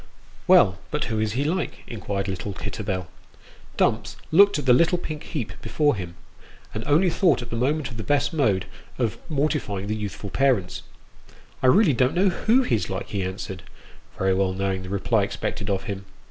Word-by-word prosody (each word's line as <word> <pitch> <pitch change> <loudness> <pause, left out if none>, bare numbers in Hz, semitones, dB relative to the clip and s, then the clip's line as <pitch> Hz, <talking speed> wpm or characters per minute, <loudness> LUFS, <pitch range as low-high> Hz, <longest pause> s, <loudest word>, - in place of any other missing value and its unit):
" - - -26
Well, 95 -1 +6
but 150 - -1
who 110 -1 -2
is 110 -1 0
he 135 +4 0
like? 170 +5 -2
" - - -26
inquired 100 -3 -3
little 95 +1 -4
Kitterbell. 95 -3 -3 0.7
Dumps - - +1 0.2
looked 200 +4 +6
at 145 - -4
the 125 - +6
little 170 +7 +4
pink 155 -3 -6
heap 140 -9 -5
before 145 -4 +1
him, 90 -3 -6 0.6
and 110 - -4
only 165 +5 +4
thought 160 - +2
at 120 - -10
the - - -2
moment 140 +4 0
of 115 - -8
the 110 - -4
best 145 +6 +1
mode 105 - +2 0.3
of 120 -4 -1
mortifying 140 -10 -1
the 105 +1 -2
youthful 105 -1 -5
parents. 130 -9 +1 0.4
" - - -25
I 130 - +3
really 180 +3 +5
don't 130 +5 +2
know 190 +2 +4
who 230 +8 +2
he's 115 - 0
like," 95 0 -4
he 100 - -2
answered, 95 0 -5 0.6
very 95 0 +2
well 95 0 +1
knowing 95 0 -1
the 90 - -8
reply 100 0 +1
expected 100 - -3
of 95 -1 0
him. 100 -1 -5
115 Hz, 195 wpm, -24 LUFS, 100-150 Hz, 0.7 s, Well